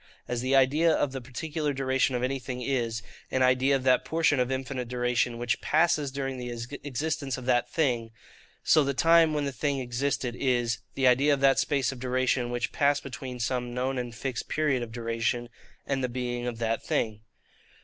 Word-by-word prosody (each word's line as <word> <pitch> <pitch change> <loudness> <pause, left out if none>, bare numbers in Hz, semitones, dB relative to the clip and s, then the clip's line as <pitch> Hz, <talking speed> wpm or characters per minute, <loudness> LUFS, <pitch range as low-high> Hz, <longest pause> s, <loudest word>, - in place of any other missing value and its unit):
As 120 -1 -2
the 130 +2 +1
idea 145 +5 +4
of 145 -3 +1
the 135 -1 -5
particular 150 +4 -3
duration 130 -1 +1
of 125 - -1
anything 130 -1 -3
is, 115 -4 -1 0.3
an 130 - +1
idea 130 +2 +4
of 135 - -2
that 130 -1 +4
portion 160 -4 +2
of 125 +1 +1
infinite 130 -1 -3
duration 125 0 0
which 120 0 -1
passes 155 -2 +2
during 135 -1 -4
the 125 0 -5 0.3
existence 145 0 -2
of 125 - -8
that 125 -1 +2
thing; 125 -8 0 0.5
so 155 - +5
the 140 -1 -1
time 165 +2 +5
when 150 -1 -1
the 140 - -2
thing 140 +1 -1
existed 125 0 -2
is, 120 -3 0 0.2
the 135 - +1
idea 130 +4 +5
of - - -7
that 135 -1 +5
space 135 -4 +1
of 130 - -9
duration 125 -1 0
which 120 -1 -2
passed 145 0 +2
between 130 -2 -7
some 120 +1 -2
known 130 +1 -1
and 120 -1 -5
fixed 120 +2 -4
period 150 -5 +1
of 120 -1 -5
duration, 115 +1 -2 0.4
and 135 -1 -1
the 125 - 0
being 120 0 -3
of 120 -2 -3
that 115 0 -1
thing. 110 -2 -1
130 Hz, 190 wpm, -28 LUFS, 120-140 Hz, 0.5 s, so